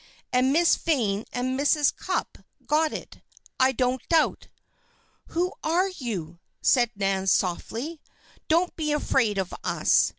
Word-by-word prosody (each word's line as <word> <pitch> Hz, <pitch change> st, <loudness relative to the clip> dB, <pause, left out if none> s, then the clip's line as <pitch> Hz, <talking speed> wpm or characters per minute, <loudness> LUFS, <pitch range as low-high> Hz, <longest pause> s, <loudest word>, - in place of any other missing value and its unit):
And 255 Hz, +1 st, +3 dB
Miss 335 Hz, +3 st, +4 dB
Vane 225 Hz, -10 st, 0 dB
and 255 Hz, +2 st, -2 dB
Mrs. 290 Hz, 0 st, +3 dB
Cupp's 375 Hz, -, -3 dB, 0.3 s
got 310 Hz, +1 st, +2 dB
it, -, -, -8 dB, 0.4 s
I 260 Hz, 0 st, +5 dB
don't 255 Hz, 0 st, 0 dB
doubt!" 325 Hz, -2 st, +2 dB, 0.8 s
"Who 360 Hz, +3 st, -1 dB
are 350 Hz, +5 st, +2 dB
you?" 195 Hz, -, -5 dB, 0.3 s
asked 245 Hz, -2 st, +5 dB
Nan, 195 Hz, -1 st, -1 dB
softly. 230 Hz, -, -1 dB, 0.5 s
"Don't 340 Hz, +3 st, +2 dB
be 305 Hz, -2 st, -1 dB
afraid 245 Hz, -8 st, +1 dB
of 190 Hz, -2 st, -2 dB
us. -, -, +3 dB
260 Hz, 130 wpm, -26 LUFS, 215-320 Hz, 0.8 s, I